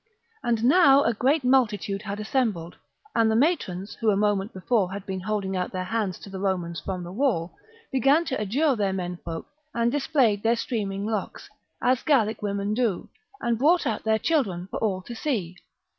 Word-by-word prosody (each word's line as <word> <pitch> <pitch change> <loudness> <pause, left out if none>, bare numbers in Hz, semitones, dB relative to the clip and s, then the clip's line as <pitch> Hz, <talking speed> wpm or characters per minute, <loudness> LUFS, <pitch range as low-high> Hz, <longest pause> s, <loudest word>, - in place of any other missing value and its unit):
And 230 -2 0
now 280 0 +6
a 235 - +2
great 270 +7 +2
multitude 210 -7 +2
had 205 -1 -5
assembled, 215 - -1 0.4
and 225 -1 +4
the 220 - +2
matrons, 220 - 0
who 225 - 0
a 200 - +3
moment 205 0 +1
before 190 0 0
had 200 0 -6
been 190 -2 -4
holding 195 -1 -2
out 180 -1 -2
their 185 0 -3
hands 200 -2 -2
to - - -10
the 190 - -6
Romans 180 -4 -1
from 185 -2 -4
the 175 - -7
wall, 195 -7 0 0.4
began 275 +6 +3
to 265 -7 -2
adjure 265 +8 +2
their 200 -3 0
men 180 -2 -3
folk 165 -1 -5 0.3
and 235 0 +2
displayed 265 -7 +2
their 230 +2 +3
streaming 205 -5 -3
locks, 215 -2 -4 0.3
as 255 0 +3
Gallic 225 -7 +2
women 200 0 -1
do, 225 -5 -1 0.3
and 235 -1 0
brought 320 +5 +4
out 225 -5 -1
their 220 0 +2
children 215 - 0
for - - -3
all 190 -4 -1
to 235 - -8
see. 220 - -2
215 Hz, 190 wpm, -25 LUFS, 190-250 Hz, 0.4 s, now